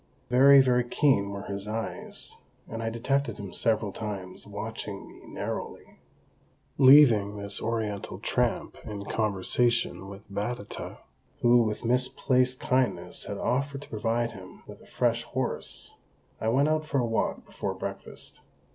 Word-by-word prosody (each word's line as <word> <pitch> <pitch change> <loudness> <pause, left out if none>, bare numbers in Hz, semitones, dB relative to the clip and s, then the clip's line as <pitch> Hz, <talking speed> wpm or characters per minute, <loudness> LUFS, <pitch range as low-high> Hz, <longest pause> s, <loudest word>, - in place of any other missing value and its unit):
Very, 135 +2 +8
very 125 -1 +3
keen 120 -5 +2
were 100 0 -5
his 100 0 -5
eyes, 110 +1 -5 0.3
and 115 +1 -5
I 115 - -1
detected 120 +1 -1
him 100 -2 -7
several 110 -2 +1
times 95 -4 -6
watching - - -6
me - - -15
narrowly. - - -6 0.8
Leaving 130 -7 +7
this 100 -1 -3
Oriental 110 -3 -2
tramp - - -1
in 100 -2 -6
conversation 110 +1 +1
with 100 +1 -11
Batata, 105 +2 -4 0.4
who 120 0 +6
with 110 0 -2
misplaced 125 +1 +1
kindness 130 0 0
had - - -4
offered 140 +2 -1
to - - -14
provide 115 +2 0
him 95 -4 -12
with - - -12
a - - -17
fresh 120 -1 +1
horse, 125 +1 -4 0.5
I 110 - -2
went 135 +6 +3
out 155 0 +1
for 145 - 0
a 125 - +2
walk 115 -1 -1
before - - -4
breakfast. - - -7
115 Hz, 140 wpm, -28 LUFS, 105-125 Hz, 0.8 s, Very